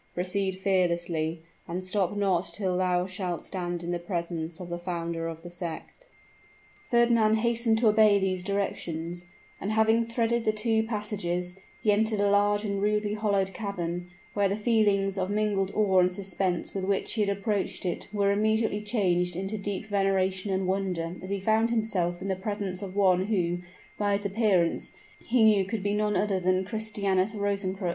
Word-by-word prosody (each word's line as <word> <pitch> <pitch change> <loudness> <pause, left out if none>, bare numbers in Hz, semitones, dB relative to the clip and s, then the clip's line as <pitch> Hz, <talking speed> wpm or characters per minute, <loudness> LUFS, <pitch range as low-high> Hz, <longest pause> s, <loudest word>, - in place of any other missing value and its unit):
Proceed 190 +1 -1
fearlessly, 170 -4 0 0.2
and 180 +2 -4
stop 195 +1 0
not 185 -4 +1
till 190 -3 -1
thou 180 -1 +1
shalt 180 -2 -4
stand 175 -2 -4
in 170 - -3
the 175 - -1
presence 170 -2 -4
of 180 -1 -7
the 175 0 -4
founder 170 -2 -3
of 165 0 -7
the 175 - -8
sect." 175 - -7 0.8
Fernand 235 -2 +4
hastened 235 0 +1
to 225 0 +3
obey 215 -1 +6
these 185 -2 -1
directions, 175 -3 -3 0.3
and 205 +3 -2
having 220 +1 +4
threaded 230 0 0
the 215 - +3
two 220 +1 +1
passages, 205 -5 -2 0.3
he 215 - +4
entered 215 +1 +1
a 200 0 +3
large 205 +1 +3
and 200 -1 -2
rudely 210 0 +1
hollowed 200 -3 0
cavern, 175 -4 -4 0.2
where 200 -1 +2
the 200 - 0
feelings 205 -3 +2
of 185 0 -1
mingled 205 -2 +1
awe 195 -3 +4
and 180 0 +4
suspense 190 -1 -2
with 195 - -3
which 195 0 0
he 220 - 0
had 205 - +2
approached 200 0 -1
it 175 - -2
were 200 -1 +2
immediately 215 0 +1
changed 180 -5 +1
into 195 +4 -3
deep 205 0 -4
veneration 195 -1 +1
and 190 0 0
wonder 180 -3 -1
as 185 - -8
he 200 0 -1
found 220 +3 +2
himself 190 -6 -1
in - - -4
the 190 - 0
presence 195 -1 -4
of 195 -1 -6
one 190 -2 +3
who, 175 -5 0 0.4
by 205 -1 +2
his 205 - -9
appearance, 195 -5 +1 0.3
he 235 -1 +2
knew 210 -3 +5
could 200 +1 -4
he 205 - +1
none 210 0 +1
other 200 -2 +1
than 185 +1 +1
Christianus 205 -2 0
Rosencrux! 195 -2 -1
195 Hz, 175 wpm, -28 LUFS, 180-210 Hz, 0.8 s, obey